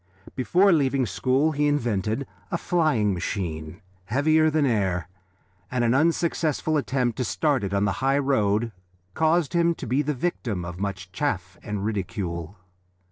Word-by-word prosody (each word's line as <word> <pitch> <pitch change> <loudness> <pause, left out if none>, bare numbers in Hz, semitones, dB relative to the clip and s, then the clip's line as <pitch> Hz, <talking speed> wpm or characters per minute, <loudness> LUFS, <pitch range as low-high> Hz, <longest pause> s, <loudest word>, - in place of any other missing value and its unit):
Before 180 +9 +4
leaving 135 -5 +2
school 130 - +1
he 150 0 +1
invented 115 -3 0 0.2
a 170 - -1
flying 155 - +1
machine 85 -2 -4 0.2
(heavier 155 +8 +3
than 155 -1 +2
air), 95 -8 0 0.6
and 125 -1 0
an 115 0 +3
unsuccessful 160 0 +1
attempt 125 -3 0
to 130 - 0
start 140 +1 0
it 100 - -2
on 100 0 +1
the 100 - +1
high 135 +1 +3
road 115 -5 +1 0.4
caused 160 - +2
him 170 -1 +3
to - - -7
be 130 +5 +1
the 150 0 -1
victim 120 - -2
of 85 +1 -7
much 100 -2 -4
chaff 95 -7 -2
and 105 -1 -4
ridicule. 95 -4 -3
125 Hz, 150 wpm, -25 LUFS, 100-150 Hz, 0.6 s, Before